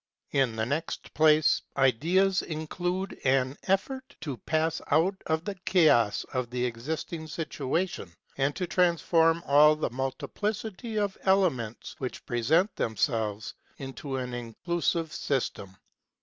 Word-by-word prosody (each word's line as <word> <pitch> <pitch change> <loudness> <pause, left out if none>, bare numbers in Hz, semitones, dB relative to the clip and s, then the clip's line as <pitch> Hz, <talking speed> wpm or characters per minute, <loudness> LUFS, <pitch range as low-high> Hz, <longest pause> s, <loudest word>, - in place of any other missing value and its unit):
In 130 -5 +2
the 110 0 -1
next 145 +6 -3
place, 155 0 +4 0.2
ideas 170 +9 +3
include 175 +4 -3
an 130 0 +2
effort 260 +8 -1
to 145 -6 -4
pass 160 +6 -1
out 165 +6 +3
of 160 +2 0
the 205 - -2
chaos 160 - +3
of 130 -2 -1
the 125 0 -1
existing 155 +7 -4
situation 155 - -3 0.2
and 135 +1 0
to 185 - -2
transform 170 -2 +3
all 150 +2 +6
the 155 - -2
multiplicity 210 - -3
of 205 -2 -1
elements, 170 - +1
which 130 -2 -5
present 160 - +2
themselves, 110 -2 -1 0.2
into 135 0 -6
an 125 -1 -4
inclusive 160 +7 -2
system. 100 -8 -2
155 Hz, 120 wpm, -28 LUFS, 125-180 Hz, 0.2 s, all